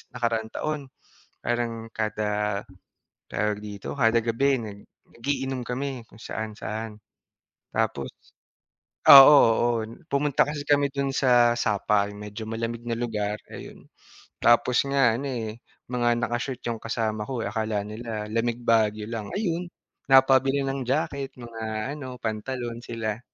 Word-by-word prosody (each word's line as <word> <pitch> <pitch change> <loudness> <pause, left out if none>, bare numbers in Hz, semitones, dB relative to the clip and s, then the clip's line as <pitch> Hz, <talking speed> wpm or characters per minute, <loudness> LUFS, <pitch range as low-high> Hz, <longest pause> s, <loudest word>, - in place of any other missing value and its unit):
nakaraang 115 -2 -1
taon 155 -1 -2 0.6
parang 115 -1 -2
kada, 105 -1 -1 0.7
tawag 105 -1 -1
dito, 100 -2 -7
kada 115 -2 +4
gabi 130 +4 +2
nag 100 -1 -8 0.4
nag-iinom 135 0 -2
kami 130 -1 -3
kung 110 - -17
saan-saan. 110 0 -5 0.8
Tapos, 70 -1 -1 1.0
oo, 140 - +14 0.3
oo, 120 +2 +2 0.4
pumunta 140 0 +3
kasi 150 -1 -4
kami 145 -1 +3
dun 140 -1 -1
sa 120 -2 +4
Sapal, 105 -1 +1
medyo 105 +1 -7
malamig 115 +1 -4
na 115 - 0
lugar, 105 -3 -2
ayun. - - -10 0.6
Tapos 120 +1 +4
nga 135 -5 +3
ano 140 +3 -4
eh, 115 -2 -5 0.3
mga 120 -1 +2
naka-short 120 +2 -2
yung 115 -2 -3
kasama 110 -2 -2
ko, 130 -4 -3
akala 110 0 -1
nila 110 0 -5
lamig 115 +1 0
Baguio 110 -2 +2
lang, 110 -3 -4
ayun, 175 -4 -1 0.4
napabili 135 +1 +5
ng 135 0 -2
jacket, 140 -1 -1
mga 115 0 -5
ano, 130 -4 -7
pantalon 120 +2 -4
sila. 115 -2 -4
115 Hz, 125 wpm, -26 LUFS, 110-130 Hz, 1.0 s, oo